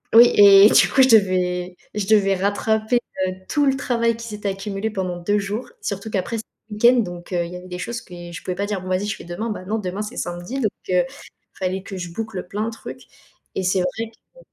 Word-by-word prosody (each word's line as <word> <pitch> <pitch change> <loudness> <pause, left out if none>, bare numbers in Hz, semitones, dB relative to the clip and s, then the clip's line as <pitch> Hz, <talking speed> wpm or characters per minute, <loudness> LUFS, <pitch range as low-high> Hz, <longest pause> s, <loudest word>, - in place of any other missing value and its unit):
oui 240 +1 +9
et 200 0 +9
du - - +6
coup, 270 - +4
je 260 - +4
devais 180 -4 +3 0.2
je 200 -2 -2
devais 200 -3 +4
rattraper, 220 +4 +1 0.3
heu, 185 - -2 0.2
tout 290 -1 +2
le 270 -1 +3
travail 235 -4 +1
qui 230 0 -8
s'est 210 -1 -5
accumulé 195 +2 -3
pendant 185 -3 -3
2 205 +4 0
jours, 205 +4 -4
surtout 200 +2 -4
qu'après, 220 +4 -1
c'était 220 - -7 0.2
le 210 - -6
week-end, 240 +3 +5
donc 175 0 -8
heu, 175 -1 +1
il 170 - -8
y - - -5
avait 180 +1 -11
des 180 0 -6
choses 235 +2 -4
que 180 - -15 0.2
je - - -8
pouvais 180 - -3
pas 200 +2 -1
dire: 200 -3 -2
«Bon, 185 - -7
va-y, 185 +3 0
je 210 - -2
fais - - -11
demain», 205 +7 -4
beh, 185 -3 -6
non, 220 +1 -1
demain, 190 +1 -4
c'est 220 +4 -8
samedi, 175 +10 -4
donc 215 -5 +1 0.2
heu, 180 -1 +4 0.5
fallait 185 0 -2
que 195 -2 -7
je 175 -2 -6
boucle 220 -2 -5
plein 210 +3 -2
de - - -3
trucs 225 - -9 0.5
et 190 - -1
c'est 185 +1 +2
vrai 225 +5 -3 0.2
que - - -17
200 Hz, 245 wpm, -22 LUFS, 185-220 Hz, 0.5 s, oui